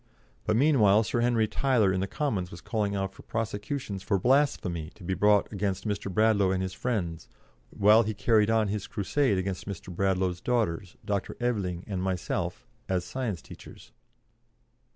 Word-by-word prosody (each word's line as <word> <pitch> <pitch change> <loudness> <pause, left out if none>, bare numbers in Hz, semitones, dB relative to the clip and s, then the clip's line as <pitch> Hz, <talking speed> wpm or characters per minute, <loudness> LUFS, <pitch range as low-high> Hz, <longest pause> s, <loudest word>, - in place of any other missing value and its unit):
But, 110 - +2
meanwhile, 115 -6 +5
Sir 115 +2 -1
Henry 120 -2 +2
Tyler 115 -7 +2
in 95 - 0
the 95 - -1
Commons 105 -12 -2
was 85 - -10
calling 105 -3 -2
out 95 -1 -2
for - - -14
prosecutions 110 -1 -4
for 100 - +1
blasphemy 95 - +1
to 95 - -14
be 95 +2 -1
brought 105 +3 +3
against 100 +1 -2
Mr. 100 -1 -2
Bradlaugh 105 -1 +3
and 95 0 0
his 95 0 -4
friends, 90 -11 -3 0.4
while 105 +3 +5
he 110 -1 -2
carried 110 0 +3
on 110 -2 +2
his 105 -1 -3
crusade 105 +2 +1
against 95 0 -3
Mr. 90 -2 -7
Bradlaugh's 95 -2 0
daughters, 100 -8 -1
Dr. 100 -2 -2
Aveling, 100 -8 -1
and 95 -3 -3
myself, 95 -1 -2 0.2
as 90 -1 0
science 115 -10 -4
teachers. - - -13
100 Hz, 165 wpm, -28 LUFS, 95-115 Hz, 0.4 s, meanwhile